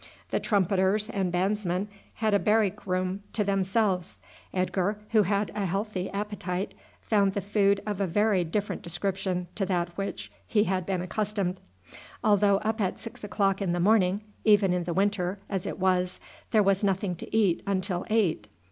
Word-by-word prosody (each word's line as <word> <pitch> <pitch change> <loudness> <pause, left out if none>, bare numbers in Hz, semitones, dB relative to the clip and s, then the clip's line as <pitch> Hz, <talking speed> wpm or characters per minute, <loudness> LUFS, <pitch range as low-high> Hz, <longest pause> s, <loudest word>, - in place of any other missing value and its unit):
The - - +1
trumpeters 200 +1 +2
and 190 -3 -1
bandsmen 185 +1 0 0.3
had 215 -1 0
a 200 - +5
barrack 210 -1 +1
room 185 +1 -1
to 210 - +1
themselves. 195 - 0 0.3
Edgar, 185 +2 0
who 220 -2 +5
had 200 +1 0
a 200 -2 -1
healthy 195 0 -2
appetite, 200 -2 -3 0.3
found 200 -3 +2
the 200 - -1
food 200 0 +2
of 205 -2 -2
a 195 - +1
very 205 +1 +2
different 195 +3 -2
description 180 +1 -2
to 205 - -2
that 175 -2 0
to - - -20
which 195 +2 -4 0.2
he 210 -2 +3
had 185 -3 -1
been 185 -2 -1
accustomed. 200 -1 -2 0.6
Although 205 -1 +4
up 220 +2 -1
at 190 - 0
six 230 - -10
o'clock 195 -1 0
in 180 -3 0
the 175 - -1
morning, 195 0 +3 0.2
even 205 -4 +5
in 180 -1 -1
the 175 - -2
winter, 195 -1 +1
as 190 -3 -3
it - - -4
was, 185 -1 +1 0.3
there 215 -3 +4
was 195 +1 +2
nothing 195 -2 0
to 220 - -3
eat 195 -6 +3
until 185 -2 -1
eight. 190 - +1
195 Hz, 175 wpm, -28 LUFS, 185-210 Hz, 0.6 s, a